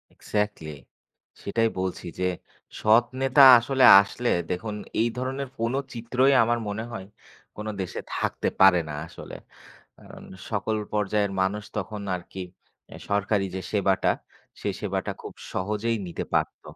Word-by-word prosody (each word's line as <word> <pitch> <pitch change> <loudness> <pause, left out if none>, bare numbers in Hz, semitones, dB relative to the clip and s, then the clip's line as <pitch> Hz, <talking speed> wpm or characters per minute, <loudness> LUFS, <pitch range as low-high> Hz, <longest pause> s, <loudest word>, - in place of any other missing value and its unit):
Exactly. 105 -7 -3 0.7
সেটাই 115 +2 +1
বলছি 95 0 -3
যে, 90 0 +1 0.5
সৎ 110 +3 +5 0.2
নেতা 135 +1 +5 0.2
আসলে 130 +2 0 0.2
আসলে 120 +4 -3 0.2
দেখুন 105 +4 -3 0.3
এই 115 - +2
ধরনের 130 +1 -3
কোনো 115 +3 0 0.2
চিত্রই 125 +3 +2
আমার 120 +1 +1
মনে 105 +2 -3
হয়, 95 -5 -6 0.5
কোনো 105 +1 -5
দেশে 90 - -5 0.2
থাকতে - - -2
পারে 95 -2 +7
না - - -5
আসলে। - - -10 0.6
কারণ - - -14 0.3
সকল 110 0 -1 0.2
পর্যায়ের 105 -1 0
মানুষ 105 +3 -1
তখন 105 +1 -4 0.2
আরকি 90 +1 -8 0.5
এ - - -8
সরকারি 100 0 +1
যে 95 - -3
সেবাটা; 100 -2 +2 0.5
সে - - -2
সেবাটা - - -2
খুব - - -8 0.2
সহজেই 105 +4 -1
নিতে 85 - -5
পারত। - - 0
105 Hz, 135 wpm, -25 LUFS, 95-115 Hz, 0.7 s, পারে